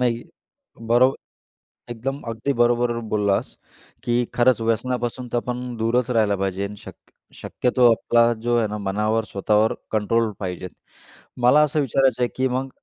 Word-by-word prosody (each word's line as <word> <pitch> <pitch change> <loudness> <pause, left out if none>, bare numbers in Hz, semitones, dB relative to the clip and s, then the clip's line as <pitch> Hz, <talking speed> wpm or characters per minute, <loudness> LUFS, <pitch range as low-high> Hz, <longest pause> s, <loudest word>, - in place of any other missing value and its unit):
नाही. 120 -1 0 0.7
बरोब 125 +3 +4 0.8
एकदम 135 +4 -4
अगदी 115 +5 -2
बरोबर 120 0 +3 0.2
बोललास 100 -2 0 0.5
की 120 0 +1
खरंच 120 -2 +3
व्यसनापासून 120 +2 -2
तर - - 0
आपण 125 0 -3
दूरच 115 +2 0
राहायला 110 -4 +2
पाहिजे. 95 +1 -2
शक - - -11 0.4
शक्यतो 125 -1 +2
आपला 115 +1 +3
जो 120 0 0
आहे 110 - +1
ना, 105 0 -4
मनावर 105 +3 -1
स्वतःवर 105 +2 +1 0.2
कंट्रोल 110 +1 +1
पाहिजे. 90 -1 -5 0.7
मला 130 +5 +6
असं 150 0 +1
विचारायचं 130 -2 +1
आहे 120 - +2
की 130 0 +1
मग 130 +2 -2
120 Hz, 140 wpm, -22 LUFS, 110-125 Hz, 0.8 s, मला